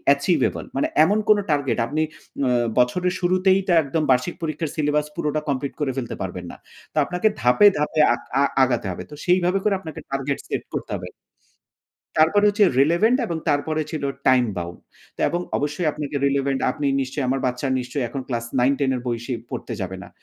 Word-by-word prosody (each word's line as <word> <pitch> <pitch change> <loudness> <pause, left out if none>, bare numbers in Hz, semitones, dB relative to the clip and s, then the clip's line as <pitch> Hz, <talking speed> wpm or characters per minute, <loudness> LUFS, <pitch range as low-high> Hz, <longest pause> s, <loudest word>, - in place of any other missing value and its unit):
achievable 140 0 0
মানে 135 - +1 0.2
এমন 205 +6 +3
কোন 215 - +7
target 140 -3 +1
আপনি 155 +5 -1 0.4
উম 120 -2 +2
বছরের 180 +9 +2
শুরুতেই 185 +2 +3
তো - - +2
একদম 155 +3 -1
বার্ষিক 130 +7 +1
পরীক্ষার 155 -1 -3
syllabus 150 -1 +1
পুরোটা 150 0 -1
complete 140 0 -2
করে 140 -2 +1
ফেলতে 125 -3 -3
পারবেন 90 -1 -5
না। - - -12 0.4
তো - - -10
আপনাকে 180 +7 0
ধাপে, 125 - +6
ধাপে 150 +1 -1
আক 120 - -5 0.2
আ - - +5 0.2
আগাতে 120 -5 0
হবে। 90 - -6
তো - - -8
সেইভাবে 180 +1 +3
করে 210 - +2
আপনাকে 160 -6 -8
target 135 0 -1
set - - -3
করতে - - -4
হবে। - - -8 1.1
তারপরে 185 +7 +4
হচ্ছে 205 0 +4 0.2
relevant 175 - +4
এবং 165 -5 -3
তারপরে 155 +2 +1
ছিল 155 -3 -4 0.2
time 125 -1 +5
bound 85 0 -6 0.4
তো - - -10
এবং 175 - -1 0.2
অবশ্যই 145 +4 -1
আপনাকে 145 -1 -4
relevant 140 -1 0
আপনি 145 +2 -3
নিশ্চয়ই 135 +1 -2
আমার 135 +1 0
বাচ্চা 125 +2 -2
নিশ্চয়ই 125 +2 -3
এখন 135 - -5
ক্লাস 120 -2 -2 0.2
9-10 135 +2 +2
এর - - -4
বই 120 -1 -1
সে 130 - -3 0.2
পড়তে - - -5
যাবে 95 0 -4
না। - - -11
145 Hz, 185 wpm, -23 LUFS, 130-165 Hz, 1.1 s, কোন